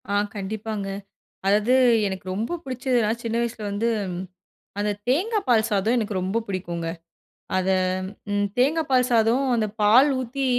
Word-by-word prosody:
ஆ - - -1 0.2
கண்டிப்பாங்க. 205 +1 -4 0.6
அதாவது 210 +4 +3 0.4
எனக்கு 190 -1 -5
ரொம்ப 225 - -2
பிடிச்சதுனா 255 -4 0
சின்ன 230 -1 -2
வயசில 230 -2 -3
வந்து, 205 +3 -1 0.9
அந்த 210 0 0 0.2
தேங்கா 390 - +2
பால் 225 -2 +4
சாதம் 210 +4 +2
எனக்கு 215 -2 -2
ரொம்ப 190 +5 0
பிடிக்குங்க. 175 -3 -3 0.7
அத 185 0 0 0.6
ம் 205 0 +1
தேங்கா 285 +6 +3
பால் 255 -1 +3
சாதம் 230 +3 +3
அந்த 220 -2 +1
பால் 235 +8 +6
ஊத்தி 260 +2 -3
220 Hz, 135 wpm, -24 LUFS, 205-250 Hz, 0.9 s, பால்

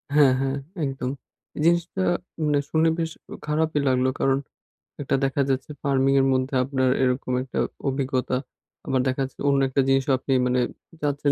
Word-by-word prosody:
হ্যাঁ, 140 -3 +6
হ্যাঁ 135 +1 -1 0.3
একদম। 135 -2 -3 0.5
এই - - -4
জিনিসটা 170 +2 +2 0.4
মানে 145 -1 +2
শুনে 160 +1 +3
বেশ 165 -1 -1 0.4
খারাপই 155 0 +1
লাগলো। 130 0 +3
কারণ, 135 0 +3 0.6
একটা 135 - 0
দেখা 135 +1 0
যাচ্ছে 135 +3 -1
ফার্মিং 135 -1 +2
এর 135 - +2
মধ্যে 130 +1 0
আপনার 130 -1 +1
এরকম 125 0 0
একটা 130 - -4 0.3
অভিজ্ঞতা। 130 -1 -1 0.5
আবার 130 -1 +2
দেখা 130 +1 0
যাচ্ছে 135 - -13
অন্য 140 -1 +3
একটা 135 +1 +2
জিনিসও 135 0 +2
আপনি 135 - -5 0.2
মানে 125 0 +2 0.4
যাচ্ছেন 145 -1 +1
135 Hz, 160 wpm, -24 LUFS, 130-145 Hz, 0.6 s, হ্যাঁ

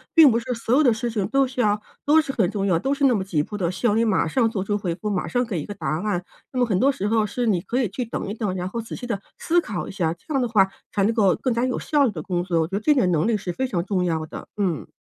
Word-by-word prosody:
并 320 -4 +9
不 230 - +2
是 240 +2 -3
所 230 +1 0
有 300 - +5
的 245 -4 +5
事 235 +2 -3
情 205 -4 -1
都 275 0 +3
需 255 0 -8
要 210 -1 +2 0.3
都 310 +2 +5
是 275 - -4
很 195 -6 +2
重 200 -2 -1
要， 180 -4 +3
都 275 +1 0
是 280 0 +1
那 250 - +4
么 195 - -1
急 155 -6 0
迫 210 - -6
的， 175 -2 0
需 240 - -5
要 210 - +2
你 230 - +3
马 195 -5 +2
上 225 +7 +2
做 205 -5 -2
出 205 +1 -1
回 180 -5 -2
复， 210 +2 -4
马 190 -3 -1
上 245 0 0
给 185 -9 -3
一 - - -6
个 205 - -6
答 - - -5
案。 200 -4 -1 0.3
那 255 - -1
么 245 - +4
很 195 -5 0
多 275 +2 +4
时 205 -5 -3
候 220 0 +2
是 240 +4 -2
你 185 -5 +2
可 250 +7 -1
以 225 - 0
去 250 +7 -3
等 230 - -4
一 - - -3
等， 210 -4 -2
然 180 0 -3
后 230 +2 -3
仔 225 - -7
细 245 - -7
地 205 -5 -2 0.2
思 345 +1 +2
考 205 - -4
一 - - -6
下， 170 -5 -1
这 175 - -9
样 270 - +2
的 245 - +1
话 200 -4 +4 0.2
才 200 - +1
能 220 +4 +2
够 200 -5 +3
更 255 - -1
加 235 +2 +1
有 255 - -1
效 290 -2 +2
率 230 - +1
地 160 -5 -6
工 175 -2 -1
作， 170 -3 +1
我 160 - 0
觉 - - -21
得 - - -1
这 295 +7 +3
点 190 -10 +2
能 160 +3 +2
力 225 -2 +2
是 185 -2 -4
非 260 +5 -1
常 175 -7 -1
重 190 -3 0
要 160 -2 -1
的， - - -9
嗯。 180 -7 -1
210 Hz, 365 characters per minute, -23 LUFS, 185-245 Hz, 0.3 s, 并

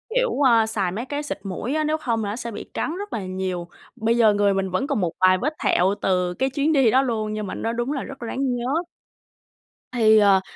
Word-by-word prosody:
kiểu, - - +2
ơ, 235 -5 +5
xài 205 -5 -1
mấy 220 +7 -4
cái 290 +2 -4
xịt 295 - -5
muỗi 200 +7 -4
á, 310 - +1
nếu 305 +1 0
không 230 -7 -1
là 205 - -2
nó 205 - -3
sẽ 235 -1 -5
bị - - -6
cắn 320 - -2
rất 410 +1 -6
là 205 -4 -3
nhiều. 185 -2 -3 0.3
Bây 230 -1 +1
giờ 220 -3 +5
người 205 -1 +2
mình 195 0 -1
vẫn 185 +10 -1
còn - - 0
một 175 -2 0
vài 185 0 +5
vết 300 +10 -1
thẹo 190 +3 +3
từ 180 -1 +1
cái 265 +8 0
chuyến 285 +4 0
đi 265 -6 +4
đó 260 - +5
luôn 220 -5 -2
nhưng 215 -1 -4
mà - - -5
nó 230 - -2
đúng 240 +3 -2
là 280 -3 -2
rất 275 - -9
ráng 250 +2 -2
nhớ. 260 +8 -1 1.1
Thì, 220 -3 +5
ờ 200 -2 +5
230 Hz, 250 wpm, -23 LUFS, 195-270 Hz, 1.1 s, ơ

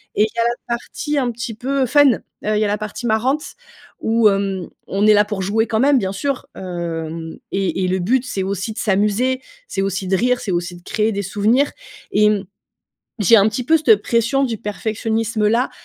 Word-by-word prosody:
Et 210 - +4
il - - +3
y - - -3
a 230 - +4
la 235 0 +1 0.2
partie 295 +5 -4
un 250 -3 +1
petit 230 0 -5
peu 265 +4 -1
fun, 285 +1 +5
heu, - - -10 0.4
il - - +2
y 215 - +2
a - - +1
la 205 +1 0
partie 215 +3 -6
marrante 255 +7 +1 0.6
où, 225 0 +3
hem, 195 -2 0 0.2
on 200 +2 +1
est 215 - +7
là 205 0 +5
pour 205 -2 -4
jouer 210 +4 +1
quand 220 - 0
même, 280 +3 +4
bien 190 -6 -1
sûr, 270 +7 -3
hem, 165 -3 -5 0.2
et 190 -1 0
et - - 0
le 185 +1 0
but 245 +8 +1
c'est 195 -6 -3
aussi 195 +2 -3
de - - -18
s'amuser, 210 +5 +1 0.3
c'est 195 - -2
aussi 195 0 -2
de 190 - +3
rire, 250 +4 +1
c'est 200 - -3
aussi 175 0 -2
de 175 - -15
créer 215 +4 0
des 200 - -2
souvenirs 220 +8 +2 0.4
et, 210 0 +4
mmh, 200 -2 -1 0.8
j'ai 210 +3 +6
un 205 +2 +5
petit 240 +3 -4
peu 320 - +4
cette 225 -9 +4
pression 235 +5 +1
du 230 -3 -3
perfectionnisme-là, 220 +2 -1
215 Hz, 215 wpm, -19 LUFS, 195-240 Hz, 0.8 s, est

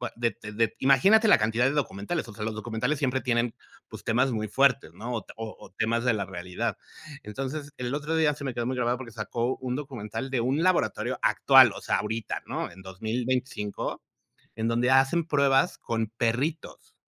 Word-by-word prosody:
de 115 0 -1
de 105 +1 -1
imagínate 195 - +5
la - - +7
cantidad 110 +3 +1
de 135 - +3
documentales, 140 - -2
o - - -9
sea, 105 - -6
los 110 -1 -3
documentales 115 +6 -2
siempre 130 -1 +1
tienen, 120 -2 0 0.4
pues, - - -10
temas 125 +3 +2
muy 110 -1 -2
fuertes, 135 - +3
¿no? 115 +7 -6
O 110 - -6
o 110 -4 -8
temas 115 +2 0
de 125 - +4
la 100 -2 -2
realidad. 90 +5 -4 0.5
Entonces, 135 +7 -5
el 125 +1 -3
otro 150 +2 -2
día 155 -2 +3
se 140 - -9
me 130 - -2
quedó 120 0 -2
muy 130 +2 -1
grabado, 120 0 +1
porque 125 -3 -9
sacó 115 +3 -2
un 125 -1 -3
documental 130 -2 -5
de 130 - 0
un 135 +6 +1
laboratorio 185 -1 +1
actual, - - +6
o - - -8
sea, - - +1
ahorita, 110 +1 -3
¿no? - - -3
En 95 - -14
2025 110 +2 -3 0.5
en 110 +1 -1
donde 120 +2 +2
hacen 135 +6 +4
pruebas 140 -4 +3
con 115 -1 -2
perritos, 130 +8 -2
120 Hz, 185 wpm, -27 LUFS, 110-135 Hz, 0.5 s, la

